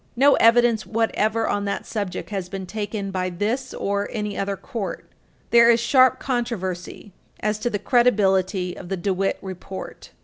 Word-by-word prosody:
No 275 +3 +5
evidence 230 -1 +4
whatever 225 0 0
on 205 0 -1
that 200 - -3
subject 205 -2 -4
has 190 -3 -3
been 190 0 -5
taken 205 0 -4
by 185 -1 -1
this 220 +9 -2
or 200 0 -2
any 210 -2 -3
other 195 0 -2
court. 215 -1 -5 0.5
There 235 0 +7
is 235 0 +5
sharp 255 +2 +4
controversy 210 -7 -4 0.3
as 210 0 -1
to 240 - -1
the 210 - -1
credibility 195 -5 +2
of 175 - -10
the 195 - -2
DeWitt 195 +1 0
report. 190 0 -8
205 Hz, 160 wpm, -23 LUFS, 190-235 Hz, 0.5 s, There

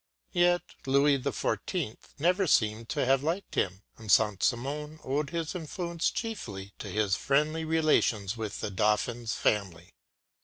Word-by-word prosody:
” - - -58
Yet 175 -1 +3 0.2
Louis 140 +1 +4
XIV. 130 - -2 0.2
never 180 +5 +2
seems 110 -4 +2
to - - 0
have 135 +1 +3
liked 165 +7 -2
him, 95 +1 -1 0.2
and 110 -3 -3
Saint 105 -1 +4
Simon 150 +5 -1
owed 140 +2 -1
his 165 -1 -3
influence 170 0 -2
chiefly 105 - -5
to - - -6
his 100 -1 +1
friendly 150 +9 +1
relations 150 -10 +2
with 110 -3 -5
the 105 - -3
Dauphin’s 110 +3 0
family. 90 -5 -1
135 Hz, 145 wpm, -29 LUFS, 105-160 Hz, 0.2 s, Louis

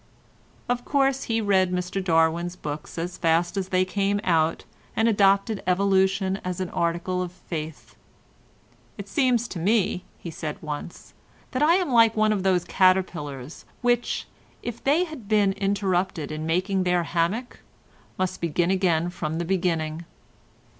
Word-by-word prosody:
Of 245 0 -1
course 270 -1 +1
he 225 -1 0
read 190 -3 +2
Mr 180 +1 -2
Darwin's 170 0 +2
books 150 0 -7
as 175 +2 -4
fast 170 +2 +2
as 190 -1 -2
they 185 0 +2
came 200 +1 0
out 165 -2 +1 0.3
and 225 - +2
adopted 200 0 +3
evolution 190 +1 +2
as 180 -1 -3
an 185 -2 -3
article 170 +2 -1
of 180 -1 -4
faith. 160 -3 -7 1.0
"It 200 - -7
seems 245 +1 +1
to 175 - -5
me," 195 0 +1
he 170 - -8
said 155 -1 -5
once, 150 +2 -7 0.4
"that 255 - -2
I 320 +3 +5
am 365 -7 0
like 230 -2 +5
one 215 0 +3
of 200 - -1
those 185 -2 +2
caterpillars 165 -7 0 0.2
which, 240 0 +1 0.4
if 235 -1 -6
they 300 +6 +3
have 310 - -8
been 205 -2 +3
interrupted 190 -5 -1
in 155 +1 -4
making 185 +3 +1
their 180 -1 +2
hammock, 180 +10 -1 0.6
must 185 -1 -2
begin 170 +2 +1
again 175 -3 +1
from 160 -2 -3
the 170 - -2
beginning. 170 -3 -1
185 Hz, 150 wpm, -25 LUFS, 170-205 Hz, 1.0 s, I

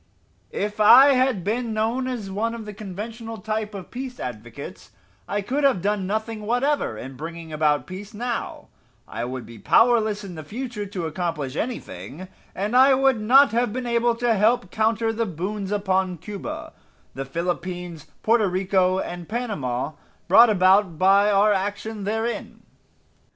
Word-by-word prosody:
If 210 +1 -3
I 260 +6 +8
had 255 -7 +1
been 225 +3 -2
known 230 +4 0
as 225 -7 -4
one 225 +4 -1
of 225 -2 -8
the 210 - -7
conventional 220 +3 -7
type 215 -1 -3
of 185 -3 -9
peace 255 0 -6
advocates 115 -4 -8 0.4
I 205 +1 -1
could 275 +8 -1
have 275 -9 +4
done 205 -2 0
nothing 220 +2 -3
whatever 245 - 0
in 130 +4 -8
bringing 165 +2 -8
about 150 -1 +1
peace 195 +3 -8
now, 235 +2 -4 0.4
I 120 - -4
would 125 -1 -5
be 115 0 -12
powerless 220 - +3
in 190 -3 -8
the 155 -2 -8
future 225 - -5
to 185 -3 -4
accomplish 160 -4 -3
anything, 185 - -5 0.3
and 205 +5 -2
I 265 +1 +7
would 265 -4 +2
not 270 +6 +6
have 235 -1 +1
been 255 +2 -4
able 235 0 +1
to 240 0 +1
help 220 0 +2
confer 225 +1 +1
the 230 0 -1
boons 195 +3 -4
upon 190 -3 0
Cuba, 300 - -7 0.4
the 135 - -4
Philippines, 170 +1 -4 0.2
Porto 225 -2 +3
Rico 185 0 +1
and 175 -2 -5
Panama, 155 - -2 0.4
brought 225 +6 +7
about 190 -3 +3
by 195 +3 +5
our 205 +1 +4
action 205 +2 -3
therein. 225 +3 -3
205 Hz, 155 wpm, -23 LUFS, 180-230 Hz, 0.4 s, I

